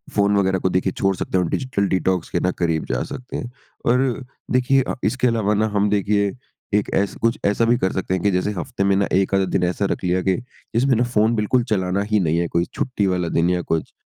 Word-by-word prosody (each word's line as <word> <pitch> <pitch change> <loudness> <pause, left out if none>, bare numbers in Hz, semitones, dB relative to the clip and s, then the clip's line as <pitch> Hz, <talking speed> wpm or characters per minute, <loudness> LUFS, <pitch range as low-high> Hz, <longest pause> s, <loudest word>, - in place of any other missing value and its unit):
Phone 100 0 +3
वग़ैरह 95 -1 +2
को 95 - 0
देखिए 90 +1 0
छोड़ 95 -1 +1
सकते 95 - -2
हैं 90 - +2
और 85 - -2
डिजिटल 100 -7 -1
डिटॉक्स 95 -2 0
के - - 0
ना 90 - +1
करीब 80 -2 0
जा - - 0
सकते 125 - -7
हैं। 120 - -6 0.3
और 125 +1 +1 0.3
देखिए 130 +2 +3
अ, - - -3
इसके 125 -1 +1
अलावा 110 -3 +1
ना 110 +1 +2
हम 105 0 +2
देखिए 100 0 +1 0.4
एक 105 - +1
ऐसा 100 0 0
कुछ 115 0 +2
ऐसा 105 +3 +2
भी 120 +1 +3
कर 95 - 0
सकते 95 -1 -2
हैं 95 - -1
कि 100 - +3
जैसे 90 +3 0
हफ़्ते 115 +1 -3
में 100 0 +3
ना 100 0 +2
1 95 +1 +2
आधा 95 0 +2
दिन - - +2
ऐसा 90 +3 0
रख - - -3
लिया 90 +1 +1
कि 95 - +2 0.4
इसमें 130 +2 +3
ना 120 - +2
फ़ोन 115 -1 +2
बिल्कुल 115 +3 +1
चलाना 95 0 0
ही 105 - +4
नहीं 85 -3 +1
है। 85 - 0
कोई 85 +1 0
छुट्टी 130 -8 -1
वाला 90 -2 0
दिन 85 +2 +2
या 90 -1 +1
कुछ, 80 -1 -2
100 Hz, 245 wpm, -21 LUFS, 90-115 Hz, 0.4 s, ही